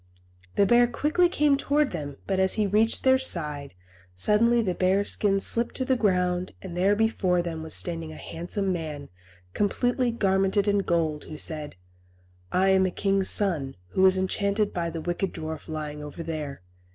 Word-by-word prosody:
The 200 - +4
bear 240 +3 +5
quickly 310 +8 +1
came 295 -4 +2
towards 285 +1 +1
them, 145 -4 -5
but 190 -1 -1
as 190 0 +2
he 215 - +1
reached 215 +3 +1
their 260 0 +4
side, 150 - -1 0.4
suddenly 230 - +3
the 185 -4 -1
bear 190 +3 +1
skin 200 -1 +1
slipped 235 +4 -1
to 260 - -2
the 260 - +2
ground, 180 -5 0
and 180 -3 -8
there 195 +3 +2
before 190 -5 +1
them 165 -2 -5
was 160 -1 -1
standing 165 -2 -2
a - - -10
handsome 185 +5 -3
man, 155 -4 -6 0.4
completely 245 +4 0
garmented 195 -2 +1
in 205 0 +3
gold, 165 -5 -1
who 155 - -8
said, 150 -4 -2 0.8
"I 190 +1 +2
am 190 0 +4
a - - -1
king's 195 +1 +1
son, 160 -10 +1
who 185 - -1
was 190 0 +5
enchanted 200 +2 0
by 170 -1 -2
the 165 0 -6
wicked 175 +3 -2
dwarf 155 0 -6
lying 150 -2 -5
over 150 +3 -7
there. 150 - -5
190 Hz, 175 wpm, -26 LUFS, 165-210 Hz, 0.8 s, bear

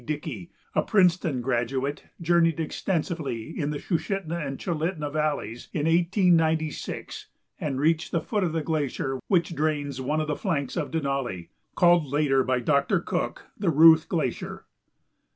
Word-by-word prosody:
Dickey, 145 - -5 0.2
a - - +3
Princeton 175 -8 +2
graduate, 130 +3 -1
journeyed 170 -1 +2
extensively 160 - -3
in 145 -3 -1
the 150 - -2
Sushitna 170 0 -2
and 135 -1 -4
Chulitna 160 -3 -2
valleys 150 -7 -2
in 150 -2 -1
1896 165 -2 +1 0.3
and 135 -3 -2
reached 160 +3 +1
the 170 - +1
foot 210 +3 -1
of 175 - 0
the 160 -1 -1
glacier 140 -4 -2
which 175 -3 +2
drains 145 -3 -1
one 150 +4 0
of 155 - 0
the 150 - -1
flanks 145 - -2
of - - -2
Denali, 135 - -2 0.3
called 175 -3 +4
later 135 -1 +2
by 130 -1 +1
Doctor 140 +8 +2
Cook - - -3
the 200 -4 0
Ruth 160 +1 +7
Glacier. 155 -8 -3
155 Hz, 145 wpm, -26 LUFS, 140-170 Hz, 0.3 s, Ruth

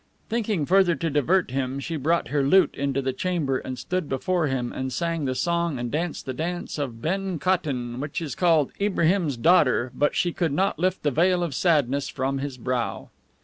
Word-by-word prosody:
Thinking 215 -8 0
further 185 0 +4
to 165 +2 -2
divert 155 +3 +2
him, 135 0 -2
she 165 +4 -4
brought 160 0 0
her 145 +1 +1
lute 185 +8 +4
into 140 -1 -1
the 130 0 -1
chamber 150 -4 -1
and 130 -1 -6
stood 180 +5 -3
before 170 +4 0
him, 130 -3 -2
and 130 0 -3
sang 165 +2 -1
the 130 -1 -1
song 170 -1 0
and 120 -1 -4
danced 165 +2 -2
the 130 - -3
dance 170 +3 -4
of 120 -5 -4
BEN 190 +1 -1
KOTTON, 140 -9 -1
which 145 +2 -3
is 155 -6 -4
called 165 -4 +2
IBRAHIM's 180 -7 +1
DAUGHTER, 130 -4 +3
but 145 - +1
she 175 -2 +1
could 165 -5 -1
not 190 +4 0
lift 185 +2 0
the 145 - +2
veil 175 +4 +2
of 165 -5 -3
sadness 140 -4 +1
from 135 +1 -2
his 135 -2 -5
brow. 125 -1 -3
150 Hz, 195 wpm, -25 LUFS, 130-175 Hz, -, further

